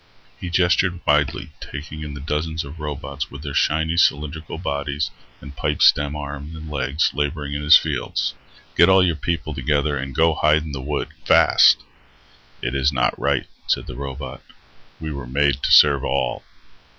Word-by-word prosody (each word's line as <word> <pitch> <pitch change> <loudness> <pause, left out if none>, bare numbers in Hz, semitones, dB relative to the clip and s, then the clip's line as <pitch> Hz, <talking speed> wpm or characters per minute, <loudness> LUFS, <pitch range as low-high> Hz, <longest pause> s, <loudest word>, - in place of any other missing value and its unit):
He 90 - -5
gestured 90 +1 +2
widely, 75 -1 +1
taking 75 +1 -8
in 75 -2 -6
the - - -7
dozens 80 +2 -2
of 75 +3 -10
robots 70 -1 -5
with 75 0 -10
their 70 -2 -5
shiny, 80 +3 +1
cylindrical 75 0 0
bodies 70 -3 -3 0.3
and 70 0 -11
pipestem 75 +1 +2
arms 75 +1 -7
and 80 -1 -9
legs 70 +1 0
laboring 75 0 -3
in 70 - -3
his 75 +2 +8
fields. - - -2 0.4
"Get 85 - +6
all 95 -1 +5
your 85 -3 0
people 80 +1 -3
together 75 0 0
and 65 -1 -6
go 80 0 +3
hide 75 0 +2
in 80 - -7
the 70 -2 -5
wood, 70 +2 -3 0.2
fast." - - +5 0.8
"It 60 - -2
is 70 +1 +2
not - - +1
right," 70 -2 0 0.2
said - - 0
the 65 - -8
robot. 65 0 -7 0.6
"We 80 -1 -5
were 70 -3 -6
made 70 +1 +1
to - - 0
serve 70 -2 +6
all." - - -1
75 Hz, 170 wpm, -21 LUFS, 70-80 Hz, 0.8 s, his